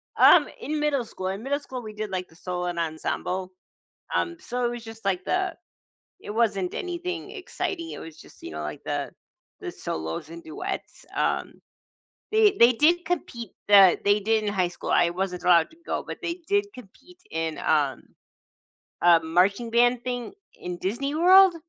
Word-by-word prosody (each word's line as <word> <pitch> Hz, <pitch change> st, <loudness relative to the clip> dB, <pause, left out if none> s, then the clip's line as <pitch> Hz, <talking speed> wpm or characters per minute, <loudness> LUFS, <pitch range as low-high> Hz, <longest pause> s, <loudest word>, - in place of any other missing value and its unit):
Um, -, -, +7 dB
in 305 Hz, +1 st, -2 dB
middle 290 Hz, -4 st, +1 dB
school 185 Hz, -4 st, -6 dB
in 195 Hz, +4 st, -4 dB
middle 285 Hz, +2 st, 0 dB
school, 260 Hz, -3 st, -7 dB
we 215 Hz, -1 st, -8 dB
did 210 Hz, -1 st, -4 dB
like 185 Hz, -1 st, -3 dB
the 160 Hz, -, -21 dB
solo 180 Hz, 0 st, -4 dB
ensemble, 175 Hz, +2 st, -3 dB, 0.6 s
um, 345 Hz, -1 st, 0 dB
so 245 Hz, +1 st, -3 dB
it -, -, +2 dB
was 240 Hz, -1 st, -6 dB
just 225 Hz, -1 st, -11 dB
like 190 Hz, -2 st, 0 dB
the 375 Hz, 0 st, 0 dB, 0.7 s
it -, -, -9 dB
wasn't 205 Hz, -5 st, 0 dB
anything 360 Hz, +1 st, -4 dB
exciting, 365 Hz, -4 st, -4 dB
it -, -, -7 dB
was 160 Hz, -1 st, -10 dB
just, -, -, -17 dB
you 80 Hz, -, -7 dB
know, 75 Hz, 0 st, -5 dB
like 75 Hz, 0 st, -5 dB
the -, -, -2 dB, 0.5 s
the -, -, -5 dB
solos 80 Hz, -, -5 dB
and 170 Hz, 0 st, -9 dB
duets. 155 Hz, -, -6 dB
Um, -, -, 0 dB, 0.8 s
they 430 Hz, -2 st, +5 dB
they 235 Hz, +1 st, +8 dB
did 335 Hz, +8 st, +3 dB
compete, 245 Hz, -, -3 dB, 0.2 s
uh, 195 Hz, -3 st, +8 dB
they 205 Hz, +1 st, +4 dB
did 220 Hz, +1 st, +1 dB
in 205 Hz, -, -1 dB
high 185 Hz, -3 st, +2 dB
school. -, -, -6 dB
I 170 Hz, -, +4 dB
wasn't 180 Hz, 0 st, -3 dB
allowed 170 Hz, -2 st, +5 dB
to 325 Hz, -, -19 dB
go, -, -, -2 dB
but -, -, -6 dB
they 340 Hz, +1 st, -4 dB
did 405 Hz, 0 st, +2 dB
compete 250 Hz, -, -15 dB
in, 160 Hz, -1 st, -2 dB
um, 145 Hz, -5 st, +1 dB, 1.0 s
uh, 170 Hz, -1 st, +7 dB
marching 190 Hz, +8 st, +2 dB
band 240 Hz, +1 st, +3 dB
thing 245 Hz, +6 st, -3 dB, 0.3 s
in 180 Hz, 0 st, -5 dB
Disney 240 Hz, +11 st, -2 dB
World. 370 Hz, +2 st, +7 dB
215 Hz, 175 wpm, -26 LUFS, 180-300 Hz, 1.0 s, they